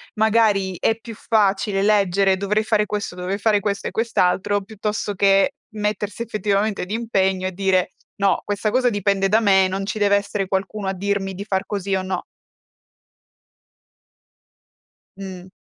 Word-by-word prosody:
magari 215 -4 +2
è 225 - +1
più 230 0 -9
facile 205 -2 +1
leggere: 195 -2 +3
“Dovrei 210 +2 0
fare 215 -1 +1
questo, 205 -4 -4
dovrei 185 +2 -3
fare 210 0 +2
questo 200 -1 -2
e - - -4
quest'altro.” 205 -3 +1
Piuttosto 210 0 -3
che 195 +7 +3 0.2
mettersi 210 +1 -2
effettivamente 210 -2 -1
d'impegno 190 -3 0
e - - -3
dire: 190 -1 0 0.2
“No, 200 -1 +1
questa 205 +1 -1
cosa 250 +1 +3
dipende 200 -2 +1
da 215 +3 +4
me, 190 -3 +4
non 190 +1 -3
ci 210 +2 -4
deve 200 -1 +4
essere 200 -1 -1
qualcuno 195 +1 -2
a 190 - 0
dirmi 195 0 -2
di 200 - -5
far 195 -2 -2
così 200 -1 -3
o 190 - +1
no.” 185 -1 -3 2.9
Mh. 190 -2 -8
200 Hz, 150 wpm, -21 LUFS, 190-210 Hz, 2.9 s, da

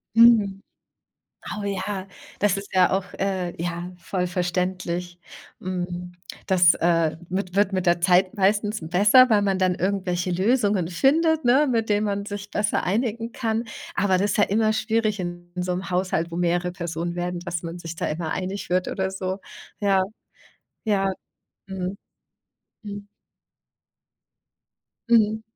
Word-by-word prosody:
Mhm. 220 -4 +5 1.0
Oh - - -5
ja, 200 -1 -3 0.3
das 200 -1 +2
ist 200 - -8
ja 185 -1 +5
auch, 190 0 0
äh, 190 -3 -1
ja, 175 +1 -4
voll 180 +1 -2
verständlich. 180 0 -2 0.4
Hm. 180 -1 -4 0.3
Das, 180 -3 +6
äh, 165 -2 +1
wi 190 +2 0
wird 200 0 +2
mit 185 -1 -1
der 175 0 +3
Zeit 185 +1 +4
meistens 205 +2 +1
besser, 205 +10 +5
weil 210 -2 +4
man 195 -1 +1
dann 185 -1 +2
irgendwelche 185 -1 -1
Lösungen 200 -1 +2
findet, 310 - +2
ne, 275 +5 +5
mit 225 -2 0
denen 210 0 +2
man 200 0 -2
sich 205 -1 -6
besser 210 0 0
einigen 230 +3 -1
kann. 225 -1 -2 0.3
Aber 190 -2 +2
das 200 +2 +1
ist - - -1
ja 205 - +5
immer 215 +2 +2
schwierig 220 -2 0
in 175 -1 -6
so 180 0 -2
'nem 185 +1 -5
Haushalt, 180 -2 0
wo - - -5
mehrere 175 +1 0
Personen 170 -1 -4
werden, 175 0 -3
dass 175 -2 -4
man 170 0 -6
sich 165 -1 -7
da - - -2
immer 160 +1 -3
einig 190 +1 -4
wird 180 0 +1
oder 190 -1 -2
so. 190 0 -3 0.4
Ja. 195 -2 +3 0.8
Ja. 195 -3 +1 0.6
Mhm. 190 0 -4 0.9
Mhm. 205 -1 -7 2.0
Mhm. 220 -2 +3
190 Hz, 150 wpm, -24 LUFS, 175-205 Hz, 2.0 s, Das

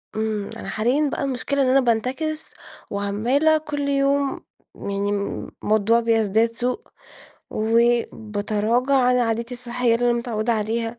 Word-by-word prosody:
امم، 215 -2 -2
أنا - - -7
حاليًا 265 +7 +1
بقى - - -2
المشكلة 275 +1 -1
إن - - +1
أنا 265 +1 +5
بانتكس 260 +7 -1 0.4
وعمالة 230 +10 +2
كل 290 -2 -3
يوم 275 0 +1 0.4
يعني 200 0 -3 0.5
الموضوع 220 +2 +3
بيزداد 225 -1 +2
سوء، 250 - -2 0.7
وبتراجع 225 +1 +1
عن 250 -1 +4
عاداتي 235 +1 -1
الصحية 245 -1 0
اللي 240 +1 0
أنا 235 - +1
متعودة 235 -1 -1
عليها. 225 +2 -2
235 Hz, 125 wpm, -23 LUFS, 220-265 Hz, 0.7 s, أنا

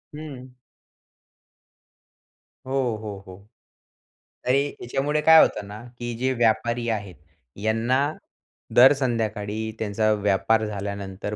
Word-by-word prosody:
हं. 130 -5 -10 2.1
हो, 130 -4 -1
हो, 105 -2 -6
हो. 95 +2 -13 1.0
तरी 135 +3 +3 0.2
याच्यामुळे 140 +5 -1
काय 160 +1 +8
होतं 100 - +1
ना, 105 +2 -9 0.2
की 120 0 -4
जे 130 +2 0
व्यापारी 120 0 +1
आहेत 100 -5 -3 0.5
यांना 115 +4 +1 0.8
दर 130 +3 +8
संध्याकाळी 110 -4 -2
त्यांचा 110 0 0
व्यापार 105 +2 +1
झाल्यानंतर 100 0 -5
110 Hz, 100 wpm, -24 LUFS, 105-130 Hz, 2.1 s, काय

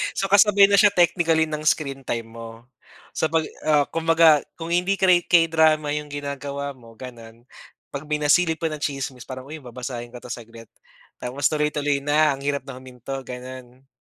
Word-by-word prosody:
So 195 - -1
kasabay 200 0 +6
na 200 - +3
siya 205 -2 +6
technically 170 -3 +2
ng 155 0 -5
screen 140 -3 0
time 115 -2 -4
mo. 115 0 -8 0.7
Sa - - 0
pag, 160 -1 +1 0.2
ah, 150 -2 +3
kumbaga 165 -2 +4 0.2
kung 165 - -5
hindi 180 +3 +1
kay 180 -2 +4
K-drama 160 -3 +4
'yung 150 0 -5
ginagawa 140 0 -5
mo 115 -3 -16
gano'n, 115 -2 -12 0.5
pag 140 +1 -5
may 150 0 -2
nasilip 160 +2 +2
pa 165 - -1
na 155 - -4
tsismis 135 -3 -4
parang, 130 0 -8
uy 155 -1 -9
babasahin 120 -1 -7
ko 125 - -10
'to - - -12
saglit, 115 -1 -9 0.6
tapos 130 +3 0
tuloy-tuloy 150 -2 -1
na 150 0 +3
ang 135 - -12
hirap 140 0 -1
na 135 - -7
huminto, 130 +1 -8
gano'n. 125 +1 -10
145 Hz, 175 wpm, -23 LUFS, 130-160 Hz, 0.7 s, kasabay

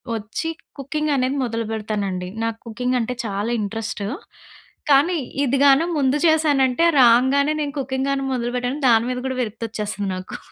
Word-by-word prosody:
వచ్చి 225 +9 -4 0.3
కుకింగ్ 300 +2 -2
అనేది 260 +1 0
మొదలుపెడతానండి. 215 -5 -3 0.2
నాకు 225 -1 -2
కుకింగంటే 250 +1 -1
చాలా 205 +2 -2
ఇంట్రెస్ట్. 215 0 -4 0.9
కానీ 315 +6 +4 0.3
ఇది 270 +1 +1
గాను 280 +4 +5
ముందు 275 0 +2
చేశానంటే, 295 -3 +3 0.2
రాంగానే 265 +5 +4
నేను 290 -1 -3
కుకింగ్ 265 +1 -2
గాను 275 -1 0
మొదలుపెట్టాను. 245 +3 -2
దాని 230 0 +4
మీద 250 0 -2
కూడా 260 -1 -3
విరక్తొచ్చేస్తుంది 215 -3 -4
నాకు. 185 0 -7
250 Hz, 130 wpm, -21 LUFS, 220-275 Hz, 0.9 s, గాను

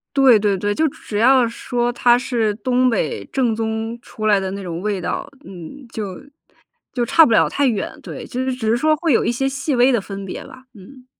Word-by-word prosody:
对 265 -5 +6
对 200 -1 +1
对， 205 +2 -1
就 315 +8 +1
只 220 -6 -6
要 255 +3 +5
说 240 +1 -2
它 240 0 +4
是 230 -4 -1
东 250 +3 +1
北 155 - -2
正 250 -4 +1
宗 225 +1 -3
出 215 -2 -5
来 205 -2 +4
的 190 -1 -3
那 200 0 -6
种 170 -2 -5
味 205 -2 -2
道， - - -4
嗯， 190 - -11
就 200 -4 -5 0.8
就 245 -2 0
差 320 +7 +6
不 230 - +1
了 - - +4
太 285 -1 +1
远， 215 -6 -1
对， - - -8
就 255 - -4
是 260 - -1
只 235 -4 -3
是 230 - +3
说 310 +4 +2
会 325 +1 -1
有 240 - +3
一 - - +1
些 270 +3 -1
细 270 +1 -2
微 250 +2 +4
的 240 - +2
分 195 0 -7
别 190 - -7
吧， 255 - -14
嗯。 250 +5 -15
235 Hz, 240 characters per minute, -20 LUFS, 205-255 Hz, 0.8 s, 对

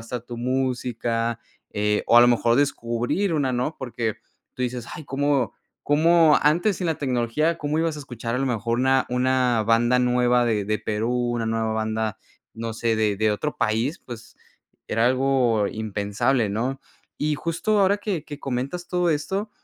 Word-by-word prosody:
estar 120 +2 -5
tu 120 0 -8
música, 120 -2 -1 0.3
eh, 105 0 0
o 120 - +7
a - - +9
lo 120 - +7
mejor 120 -1 +3
descubrir 140 - 0
una, 145 -4 +1
¿no? 125 +6 -2
Porque 115 -4 -3 0.4
tú - - -11
dices: 125 -1 -3
"Ay, 155 - -8
¿cómo 135 -4 0 0.3
cómo?, 160 +1 +4
antes 170 +7 +2
sin 180 - -3
la 160 - 0
tecnología, 135 +5 0
¿cómo 150 0 -1
ibas 165 -1 0
a - - -7
escuchar 120 -3 -5
a - - 0
lo 135 - 0
mejor 115 -1 -1
una 130 +1 +2
una 125 -2 +1
banda 120 +2 +3
nueva 125 0 +3
de 110 -4 0
de 105 0 0
Perú, 110 +3 -2 0.2
una 115 -1 -2
nueva 110 0 -1
banda, 110 0 -2 0.3
no 115 -1 -5
sé, 115 0 0
de 105 -2 +1
de 110 +1 +2
otro 145 +8 -2
país?" 115 +8 0
Pues 115 -2 -10 0.5
era 115 +2 +1
algo 130 -4 +2
impensable, 110 +2 -1
¿no? 125 +6 -2 0.4
Y 150 0 0
justo 170 +7 -1
ahora 195 +1 +4
que 205 -6 -3
que 145 -2 -8
comentas 140 +7 -4
todo 180 -1 +1
esto, 190 +7 -1
125 Hz, 175 wpm, -24 LUFS, 115-145 Hz, 0.5 s, a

